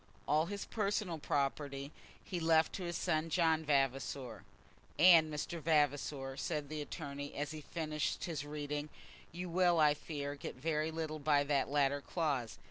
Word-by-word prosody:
All 155 +2 +3
his 200 +1 -4
personal 200 -5 -1
property 140 0 -1 0.3
he 180 - -3
left 160 -1 +3
to 190 - -4
his 175 -1 -2
son, 165 -2 0
John 160 -1 +2
Vavasor. 135 -4 0 0.6
"And, 165 -2 +7
Mr. 160 +2 -4
Vavasor," 145 -3 +1
said 150 0 -2
the 155 -1 -3
attorney, 145 -1 -6
as 145 0 -2
he 155 -1 -6
finished 155 0 -2
his 155 -5 -3
reading, 145 0 -4 0.4
"you 180 +2 -5
will, 175 -1 +3
I 150 -1 +6
fear, 145 -1 -5
get 145 - -7
very 155 +3 -1
little 160 -1 -4
by 145 -1 +3
that 140 -1 +1
latter 140 0 +2
clause. 140 -8 -2
150 Hz, 155 wpm, -35 LUFS, 145-165 Hz, 0.6 s, And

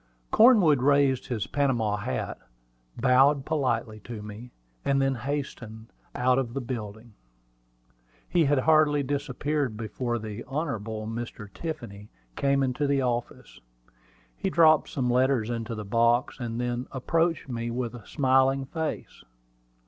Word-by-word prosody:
Cornwood 205 - +6
raised 140 -1 +3
his 115 -5 -2
Panama 120 -7 0
hat, - - -4 0.6
bowed 135 +3 +4
politely 120 -8 -1
to 110 -1 -8
me, 105 +4 -9 0.3
and 140 0 +2
then 135 0 +2
hastened 120 -4 -5 0.2
out 125 +1 +3
of 120 -2 -4
the - - 0
building. 115 -3 -7 1.1
He 170 -3 +2
had 145 0 +2
hardly 150 -1 +4
disappeared 140 -2 -2
before 120 +2 -3
the 110 0 -6
Hon. 140 -5 -3 0.2
Mr. 115 -2 -6
Tiffany 115 -11 -7 0.3
came 140 0 +2
into 135 +3 0
the 140 -1 +1
office. 120 -1 -4 0.8
He 195 - -2
dropped 160 -4 +5
some 130 -3 -2
letters 125 -2 +2
into 115 0 -4
the 105 -1 -6
box, 115 +5 +2
and 120 -1 -4
then 120 0 -2
approached 165 +5 0
me 120 -2 -3
with 120 0 -3
a 115 -4 -11
smiling 135 -1 +2
face. 160 +2 -5
125 Hz, 135 wpm, -27 LUFS, 115-140 Hz, 1.1 s, Cornwood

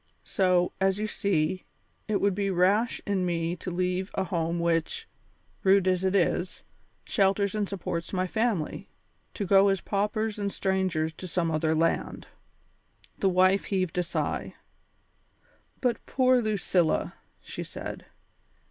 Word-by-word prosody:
So, 180 -2 +2
as 190 0 +3
you 210 - -1
see, 185 -4 0 0.4
it 210 -2 +1
would 200 -1 +2
be 200 +1 -1
rash 195 +6 +2
in 200 -2 0
me 170 -1 -1
to 180 - -6
leave 180 +2 -1
a 190 - +1
home 170 -2 -1
which, 170 - 0 0.5
rude 195 -1 +4
as 185 0 +2
it 190 +1 +1
is, 180 0 0 0.4
shelters 195 0 +2
and 210 -2 -1
supports 180 -3 -4
my 185 -1 0
family, 220 -4 -1 0.5
to 205 - -2
go 195 +1 +5
as 195 -1 +2
paupers 210 +2 -1
and 200 -1 -1
strangers 185 -6 0
to 185 - -8
some 170 -1 0
other 155 0 +1
land." 165 +1 -1 0.9
The 195 - +3
wife 185 +2 +3
heaved 185 -4 -1
a - - +4
sigh. 175 - -3 1.3
"But 250 -2 0
poor 255 -1 +3
Lucilla!" 195 -6 +1 0.3
she - - -7
said. - - -7
190 Hz, 140 wpm, -27 LUFS, 175-200 Hz, 1.3 s, go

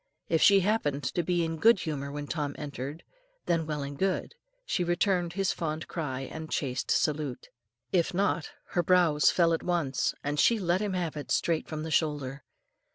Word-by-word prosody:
If 160 -2 +2
she 200 -1 +7
happened 160 -9 0
to 130 +7 0
be 175 0 +1
in 165 0 -3
good 225 +1 +5
humour 140 -3 -3
when 145 0 -5
Tom 145 -2 -3
entered, 145 +1 -6 0.4
then 165 -2 0
well 150 -2 -2
and 140 +1 -6
good, 190 - -1 0.3
she 180 - 0
returned 175 0 +1
his 195 0 0
fond 155 -1 -3
cry 135 -6 -3
and 160 +4 -7
chaste 130 -3 -2
salute. 150 -4 0 0.4
If 180 -1 +2
not, 175 -5 0 0.2
her 175 - +1
brows 170 -4 +4
fell 170 -2 +3
at 165 - 0
once, 165 -7 0
and 145 +1 -1
she 235 - +5
let 180 -1 +1
him 205 -2 -1
have 175 -4 -2
it 150 - -6
straight 165 -2 +1
from 155 -1 -4
the 160 - -5
shoulder. 145 -4 0
160 Hz, 185 wpm, -29 LUFS, 145-175 Hz, 0.4 s, she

